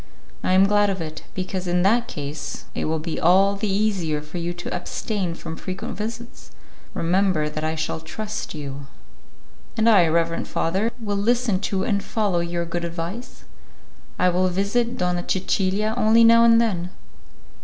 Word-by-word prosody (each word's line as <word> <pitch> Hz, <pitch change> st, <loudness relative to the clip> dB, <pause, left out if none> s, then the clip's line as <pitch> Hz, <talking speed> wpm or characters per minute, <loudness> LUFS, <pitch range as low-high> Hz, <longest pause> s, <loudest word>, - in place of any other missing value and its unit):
"I 185 Hz, -, +2 dB
am 190 Hz, +1 st, +6 dB
glad 205 Hz, 0 st, +3 dB
of 190 Hz, -1 st, -2 dB
it, 155 Hz, -1 st, -6 dB
because 185 Hz, 0 st, -3 dB
in 175 Hz, 0 st, +2 dB
that 235 Hz, +5 st, +3 dB
case 145 Hz, -1 st, -6 dB
it -, -, -2 dB
will 160 Hz, +1 st, 0 dB
be 160 Hz, +1 st, -4 dB
all 195 Hz, +4 st, +4 dB
the 205 Hz, +1 st, -2 dB
easier 190 Hz, -7 st, 0 dB
for 150 Hz, +4 st, -6 dB
you 170 Hz, +1 st, -2 dB
to 175 Hz, 0 st, -5 dB
abstain 180 Hz, 0 st, -3 dB
from 160 Hz, -1 st, -7 dB
frequent 185 Hz, +3 st, -5 dB
visits. 230 Hz, +3 st, -7 dB, 0.5 s
Remember 170 Hz, -3 st, +1 dB
that 155 Hz, 0 st, -5 dB
I 160 Hz, 0 st, -1 dB
shall 160 Hz, 0 st, -2 dB
trust 210 Hz, +5 st, -5 dB
you." 140 Hz, -2 st, -7 dB, 0.9 s
"And 220 Hz, +1 st, +3 dB
I, 195 Hz, -7 st, +6 dB
reverend 165 Hz, +1 st, 0 dB
father; 190 Hz, +7 st, 0 dB
will 205 Hz, -3 st, -2 dB
listen 230 Hz, -1 st, +1 dB
to 190 Hz, -1 st, 0 dB
and 200 Hz, -2 st, 0 dB
follow 205 Hz, -6 st, 0 dB
your 170 Hz, 0 st, -2 dB
good 170 Hz, +1 st, -3 dB
advice. 170 Hz, +8 st, -6 dB, 0.7 s
I 180 Hz, -, +3 dB
will 180 Hz, +1 st, +2 dB
visit 200 Hz, +6 st, 0 dB
Donna 180 Hz, -1 st, 0 dB
Cecilia 195 Hz, +3 st, 0 dB
only 230 Hz, -1 st, +5 dB
now 230 Hz, 0 st, +7 dB
and 230 Hz, 0 st, +6 dB
then." 185 Hz, -7 st, 0 dB
185 Hz, 165 wpm, -23 LUFS, 170-210 Hz, 0.9 s, now